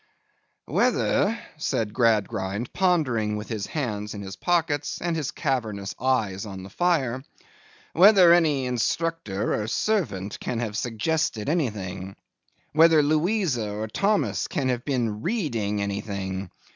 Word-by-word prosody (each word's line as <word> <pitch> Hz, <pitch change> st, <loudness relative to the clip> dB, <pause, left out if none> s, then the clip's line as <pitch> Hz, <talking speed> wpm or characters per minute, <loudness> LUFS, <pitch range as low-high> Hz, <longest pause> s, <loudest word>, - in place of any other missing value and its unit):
'Whether,' 220 Hz, +3 st, +2 dB, 0.2 s
said 115 Hz, -8 st, -1 dB
Gradgrind, 105 Hz, -2 st, 0 dB
pondering 130 Hz, -, +1 dB
with 105 Hz, -, -7 dB
his 105 Hz, -3 st, -3 dB
hands 105 Hz, -8 st, -3 dB
in 100 Hz, -, -6 dB
his 95 Hz, 0 st, -7 dB
pockets, 165 Hz, -5 st, 0 dB
and 170 Hz, -1 st, -1 dB
his 155 Hz, -4 st, -2 dB
cavernous 110 Hz, -, -2 dB
eyes 115 Hz, -7 st, 0 dB
on 95 Hz, -2 st, -7 dB
the 95 Hz, -, -10 dB
fire, 135 Hz, -, 0 dB, 0.7 s
'whether 185 Hz, -1 st, +7 dB
any 150 Hz, -6 st, +3 dB
instructor 125 Hz, -4 st, -1 dB
or 105 Hz, -, -4 dB
servant 110 Hz, -, -1 dB
can 120 Hz, -, -3 dB
have 110 Hz, -3 st, -3 dB
suggested 115 Hz, +1 st, -1 dB
anything? 100 Hz, -, -2 dB, 0.6 s
Whether 160 Hz, 0 st, +6 dB
Louisa 155 Hz, -, +1 dB
or 105 Hz, +2 st, -4 dB
Thomas 200 Hz, -, 0 dB
can 140 Hz, -7 st, -1 dB
have 125 Hz, -1 st, -1 dB
been 115 Hz, -6 st, -1 dB
reading 115 Hz, -, -1 dB
anything? 100 Hz, -2 st, -4 dB
120 Hz, 125 wpm, -25 LUFS, 105-160 Hz, 0.7 s, whether